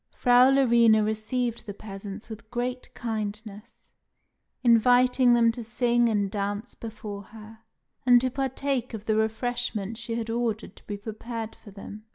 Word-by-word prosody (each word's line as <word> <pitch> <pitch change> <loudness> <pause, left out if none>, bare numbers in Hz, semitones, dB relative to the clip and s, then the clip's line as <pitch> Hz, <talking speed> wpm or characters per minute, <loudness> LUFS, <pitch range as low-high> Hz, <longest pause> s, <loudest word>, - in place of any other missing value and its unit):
Frau 245 +1 +5
Larina 235 -5 +5
received 230 +2 -2
the 205 - -6
peasants 200 0 -8
with 220 0 -10
great 245 +1 -4
kindness, 215 0 -6 0.8
inviting 245 +1 +5
them 230 -1 +4
to 235 +1 -7
sing 240 +1 +2
and 205 -3 0
dance 205 +2 -3
before 215 -2 -7
her; 220 +1 -13 0.4
and 245 -1 +6
to 255 0 0
partake 265 -2 -2
of 215 -1 -9
the 215 - +1
refreshment 220 -1 -1
she 230 -1 -4
had 230 -1 -3
ordered 230 -2 -2
to - - -19
be 205 - -4
prepared 225 +2 -6
for - - -15
them. 205 +2 -10
225 Hz, 150 wpm, -26 LUFS, 215-245 Hz, 0.8 s, and